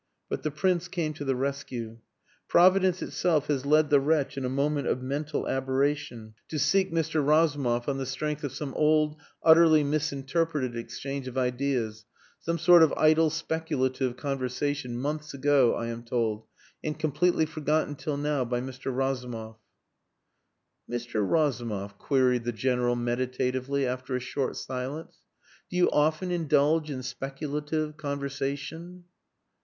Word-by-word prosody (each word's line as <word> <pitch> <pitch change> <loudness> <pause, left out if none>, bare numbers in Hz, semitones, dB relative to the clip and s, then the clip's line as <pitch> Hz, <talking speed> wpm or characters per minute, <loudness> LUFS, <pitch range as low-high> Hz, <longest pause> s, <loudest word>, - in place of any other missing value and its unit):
But - - -3
the 155 - -1
Prince 175 +3 0
came 170 -4 -2
to 145 - -7
the 135 -2 0
rescue. 125 -4 -4 0.5
"Providence 185 0 +4
itself 160 -5 +1
has 140 -2 0
led 155 0 +4
the 145 - +7
wretch 145 -1 +1
in 135 - -4
a 125 - -1
moment 140 +2 0
of 130 - -1
mental 145 +3 -2
aberration 135 -3 -1 0.2
to 155 - -3
seek 185 +6 +2
Mr. 160 -2 0
Razumov 145 -6 +2
on 135 -1 -1
the 135 - -3
strength 150 +3 -3
of 140 - -2
some 135 0 -5
old, 155 0 +2 0.3
utterly 160 -2 +7
misinterpreted 145 -2 -1
exchange 135 +3 -5
of 130 +1 -6
ideas 125 -4 -1 0.3
some 170 0 -2
sort 175 +1 +7
of 160 - +6
idle 155 +1 +5
speculative 145 -6 -1
conversation 135 -1 -2
months 150 +2 -3
ago 140 -3 +3
I 115 - -3
am 115 0 -5
told 115 -2 -2 0.4
and 155 -1 -3
completely 160 +2 +2
forgotten 155 -1 -1
till 145 0 -4
now 145 -2 0
by 120 0 -1
Mr. 130 +1 -8
Razumov." 125 -4 -3 1.3
"Mr. 120 -3 -2
Razumov," 115 - -1
queried 130 -3 +2
the 120 - -1
General 125 +1 0
meditatively, 130 +3 -1
after 130 +1 -3
a - - 0
short 130 +2 -3
silence, 130 +5 -5 0.5
"do 180 - -3
you 180 - +4
often 155 +5 +1
indulge 155 -1 +2
in 130 -3 -4
speculative 150 +4 -3
conversation?" 140 +5 -4
140 Hz, 140 wpm, -28 LUFS, 125-155 Hz, 1.3 s, the